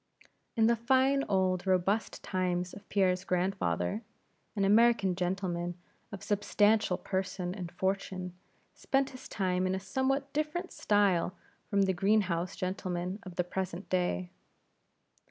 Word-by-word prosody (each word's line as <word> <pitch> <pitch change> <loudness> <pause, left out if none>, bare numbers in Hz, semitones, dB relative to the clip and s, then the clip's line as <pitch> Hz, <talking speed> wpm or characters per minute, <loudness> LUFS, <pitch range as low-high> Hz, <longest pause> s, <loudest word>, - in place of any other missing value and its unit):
In 225 - +4
the 235 +1 +4
fine 265 +4 +3
old 185 -1 +1
robust 190 +3 +1
times 180 -2 -1
of 205 - -12
Pierre's 185 -2 +2
grandfather, 175 - 0 0.5
an 200 -2 +1
American 210 -2 +4
gentleman 175 -1 -2 0.3
of 200 - -7
substantial 205 -1 +2
person 185 -1 -3
and 180 -4 -6
fortune 190 -1 -2 0.4
spent 270 0 0
his 255 0 -10
time 185 -2 0
in 185 - 0
a - - -2
somewhat 265 +7 -1
different 310 +5 -2
style 200 -3 +2 0.3
from 200 -1 +3
the 190 -1 +2
green 205 +4 +3
house 175 -2 -2
gentlemen 185 0 -3
of 185 -2 -10
the 180 - +1
present 185 +1 -4
day. 180 0 0
190 Hz, 135 wpm, -31 LUFS, 180-210 Hz, 0.5 s, In